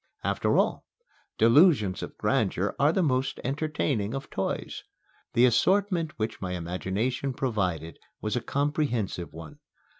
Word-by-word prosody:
After -, -, +1 dB
all, -, -, +1 dB, 0.5 s
delusions 115 Hz, -, +5 dB
of -, -, -7 dB
grandeur -, -, 0 dB
are 145 Hz, +2 st, +5 dB
the 185 Hz, +2 st, +1 dB
most 130 Hz, -3 st, 0 dB
entertaining 135 Hz, -5 st, -1 dB
of 135 Hz, 0 st, -6 dB
toys. 95 Hz, -, -3 dB, 0.5 s
The 120 Hz, -, +5 dB
assortment 180 Hz, -, +2 dB
which 110 Hz, 0 st, -3 dB
my 90 Hz, -2 st, -3 dB
imagination 100 Hz, +10 st, -2 dB
provided 90 Hz, -, -2 dB, 0.2 s
was 105 Hz, +2 st, -2 dB
a 125 Hz, -, 0 dB
comprehensive 140 Hz, -, -1 dB
one. 80 Hz, -1 st, -11 dB
125 Hz, 125 wpm, -27 LUFS, 95-145 Hz, 0.5 s, delusions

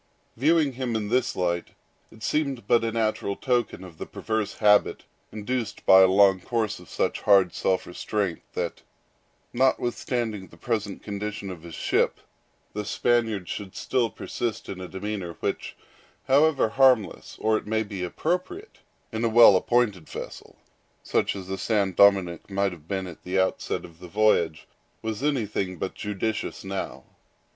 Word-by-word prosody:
Viewing 150 Hz, +2 st, +3 dB
him 125 Hz, -2 st, -3 dB
in 105 Hz, -2 st, -2 dB
this 125 Hz, +2 st, +1 dB
light, 85 Hz, -1 st, -2 dB, 0.3 s
it 110 Hz, -, -15 dB
seemed 140 Hz, -5 st, -1 dB
but 115 Hz, -, +3 dB
a 115 Hz, -, 0 dB
natural 110 Hz, -3 st, -1 dB
token 120 Hz, -6 st, -1 dB
of 85 Hz, -4 st, -12 dB
the -, -, -5 dB
perverse 110 Hz, -2 st, -2 dB
habit 105 Hz, -1 st, +3 dB, 0.3 s
induced 110 Hz, +1 st, -4 dB
by 95 Hz, 0 st, +8 dB
a 95 Hz, -, +8 dB
long 95 Hz, 0 st, +5 dB
course 110 Hz, +1 st, -2 dB
of 90 Hz, -, -15 dB
such -, -, -1 dB
hard 95 Hz, -4 st, +5 dB
self 95 Hz, -1 st, 0 dB
restraint, 95 Hz, 0 st, -2 dB
that, -, -, -3 dB, 0.7 s
notwithstanding 120 Hz, -4 st, 0 dB
the 85 Hz, -, -17 dB
present 105 Hz, 0 st, -3 dB
condition 105 Hz, -1 st, -5 dB
of 90 Hz, -3 st, -9 dB
his 85 Hz, -1 st, -9 dB
ship, -, -, +1 dB, 0.5 s
the 105 Hz, -, -3 dB
Spaniard 110 Hz, -3 st, 0 dB
should 100 Hz, 0 st, -6 dB
still 125 Hz, -3 st, 0 dB
persist 115 Hz, +1 st, -4 dB
in 95 Hz, -1 st, -6 dB
a 90 Hz, -, -6 dB
demeanor, 95 Hz, -2 st, -5 dB
which, -, -, -4 dB, 0.5 s
however 140 Hz, -2 st, +4 dB
harmless, 130 Hz, -4 st, +2 dB
or, 110 Hz, 0 st, +2 dB
it 110 Hz, -, -3 dB
may 110 Hz, +1 st, +1 dB
be, 100 Hz, -3 st, -6 dB
appropriate, 180 Hz, -, -3 dB, 0.3 s
in 110 Hz, 0 st, -3 dB
a 115 Hz, -, +3 dB
well 115 Hz, -3 st, +8 dB
appointed 105 Hz, -4 st, +1 dB
vessel, -, -, -8 dB, 0.5 s
such -, -, 0 dB
as 95 Hz, -2 st, -7 dB
the 95 Hz, 0 st, -4 dB
San 105 Hz, -4 st, +1 dB
Dominick 95 Hz, -3 st, +4 dB
might 100 Hz, 0 st, 0 dB
have 80 Hz, -3 st, -12 dB
been 95 Hz, 0 st, -2 dB
at 85 Hz, -3 st, -10 dB
the 90 Hz, +1 st, -2 dB
outset 95 Hz, -, -1 dB
of 85 Hz, -1 st, -15 dB
the 90 Hz, -, -10 dB
voyage, 85 Hz, -5 st, +2 dB, 0.4 s
was 110 Hz, +1 st, -3 dB
anything 105 Hz, -10 st, -1 dB
but 95 Hz, -, -3 dB
judicious 105 Hz, +1 st, -3 dB
now. 95 Hz, 0 st, -5 dB
105 Hz, 160 wpm, -26 LUFS, 95-120 Hz, 0.7 s, by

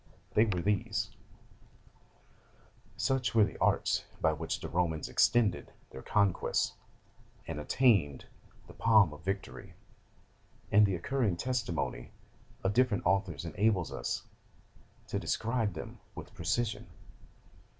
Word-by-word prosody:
They 110 Hz, -, +5 dB
were 90 Hz, -6 st, -1 dB
these: 105 Hz, +1 st, 0 dB, 1.9 s
"Such 130 Hz, -3 st, 0 dB
were 110 Hz, -, +7 dB
the -, -, -3 dB
arts -, -, +2 dB, 0.2 s
by 80 Hz, -, +2 dB
which 80 Hz, +1 st, -3 dB
the -, -, -6 dB
Romans 80 Hz, -3 st, -1 dB
extended 110 Hz, -7 st, +2 dB, 0.2 s
their 65 Hz, -, -9 dB
conquests, 100 Hz, +3 st, +1 dB, 0.7 s
and 75 Hz, -, -5 dB
attained 95 Hz, -, +2 dB, 0.4 s
the -, -, -13 dB
palm 110 Hz, -8 st, +4 dB
of 75 Hz, +2 st, -13 dB
victory; 95 Hz, +1 st, -5 dB, 1.0 s
and 105 Hz, +1 st, +6 dB
the 95 Hz, -, -1 dB
concurring 105 Hz, +1 st, 0 dB
testimony 90 Hz, -, -3 dB, 0.5 s
of 95 Hz, -, +1 dB
different 125 Hz, -4 st, +2 dB
authors 95 Hz, -5 st, 0 dB
enables 95 Hz, +2 st, +1 dB
us -, -, -3 dB, 0.8 s
to -, -, -2 dB
describe 110 Hz, -3 st, -1 dB
them 80 Hz, -, -8 dB, 0.2 s
with -, -, -9 dB
precision..." 120 Hz, -3 st, -2 dB
100 Hz, 115 wpm, -31 LUFS, 85-115 Hz, 1.9 s, were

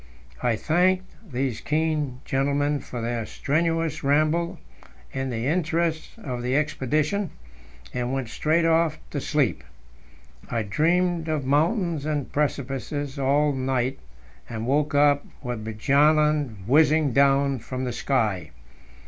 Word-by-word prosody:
I 120 Hz, -2 st, +2 dB
thanked 185 Hz, -, +1 dB, 0.2 s
these 125 Hz, -3 st, -2 dB
keen 150 Hz, -4 st, -1 dB
gentlemen 145 Hz, +2 st, +1 dB
for 125 Hz, -2 st, -7 dB
their 115 Hz, 0 st, -2 dB
strenuous 165 Hz, +1 st, -1 dB
ramble 155 Hz, +4 st, +2 dB, 0.6 s
in 135 Hz, 0 st, -2 dB
the 115 Hz, -1 st, -3 dB
interests 165 Hz, +1 st, 0 dB
of 130 Hz, -, -5 dB
the 125 Hz, +2 st, 0 dB
expedition, 150 Hz, +6 st, 0 dB, 0.6 s
and 125 Hz, 0 st, -2 dB
went 135 Hz, -2 st, -2 dB
straight 160 Hz, +6 st, +1 dB
off 165 Hz, -1 st, +3 dB
to 145 Hz, -, -3 dB
sleep. 150 Hz, -6 st, 0 dB, 0.9 s
I 115 Hz, -1 st, -1 dB
dreamed 170 Hz, -, +1 dB
of 155 Hz, -4 st, -1 dB
mountains 160 Hz, -, +1 dB
and 145 Hz, -3 st, -2 dB
precipices 140 Hz, 0 st, -2 dB
all 145 Hz, +2 st, +2 dB
night, 130 Hz, -1 st, -1 dB, 0.5 s
and 115 Hz, -1 st, -4 dB
woke 145 Hz, +3 st, +1 dB
up 145 Hz, 0 st, +4 dB, 0.2 s
with 120 Hz, -4 st, -4 dB
Bjaaland 140 Hz, 0 st, +2 dB
whizzing 150 Hz, +2 st, +4 dB
down 140 Hz, 0 st, +3 dB
from 130 Hz, +3 st, -5 dB
the 125 Hz, -2 st, -2 dB
sky. 110 Hz, -, 0 dB
145 Hz, 125 wpm, -25 LUFS, 130-155 Hz, 0.9 s, up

